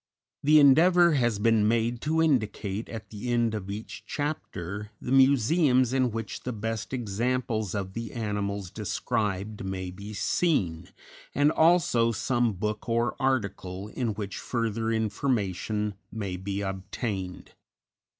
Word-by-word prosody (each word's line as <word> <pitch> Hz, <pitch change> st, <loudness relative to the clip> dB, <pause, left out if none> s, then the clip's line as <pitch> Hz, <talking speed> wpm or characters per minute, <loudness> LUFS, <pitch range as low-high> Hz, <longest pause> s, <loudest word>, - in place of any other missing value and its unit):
_ -, -, +1 dB
_The 155 Hz, 0 st, +8 dB
endeavor 170 Hz, +5 st, +6 dB
has 120 Hz, -6 st, +2 dB
been 110 Hz, 0 st, +3 dB
made 115 Hz, +1 st, +1 dB
to 160 Hz, +2 st, +2 dB
indicate, 110 Hz, -7 st, 0 dB
at 110 Hz, -4 st, -8 dB
the 110 Hz, +3 st, -5 dB
end 120 Hz, -2 st, +2 dB
of 100 Hz, -3 st, -4 dB
each 105 Hz, +3 st, -6 dB
chapter, 105 Hz, -, -4 dB
the 125 Hz, -, -5 dB
museums 130 Hz, 0 st, +4 dB
in 130 Hz, -2 st, +2 dB
which 115 Hz, -3 st, -5 dB
the 125 Hz, -, -4 dB
best 115 Hz, -1 st, -4 dB
examples 115 Hz, -3 st, -1 dB
of 95 Hz, -2 st, -3 dB
the 115 Hz, -1 st, -5 dB
animals 100 Hz, -4 st, -3 dB
described 105 Hz, 0 st, -2 dB
may 95 Hz, -1 st, -4 dB
be 100 Hz, +3 st, -9 dB
seen, 90 Hz, -, 0 dB, 0.5 s
and 145 Hz, +1 st, +4 dB
also 160 Hz, -9 st, +4 dB
some 120 Hz, +1 st, +1 dB
book 105 Hz, +4 st, -3 dB
or 115 Hz, +1 st, +1 dB
article 100 Hz, -7 st, -1 dB
in 115 Hz, -2 st, -2 dB
which 100 Hz, -2 st, -5 dB
further 115 Hz, -1 st, -1 dB
information 105 Hz, -2 st, -1 dB, 0.2 s
may 100 Hz, -5 st, -4 dB
be 100 Hz, +2 st, -3 dB
obtained. 95 Hz, 0 st, -4 dB
110 Hz, 135 wpm, -27 LUFS, 100-125 Hz, 0.5 s, The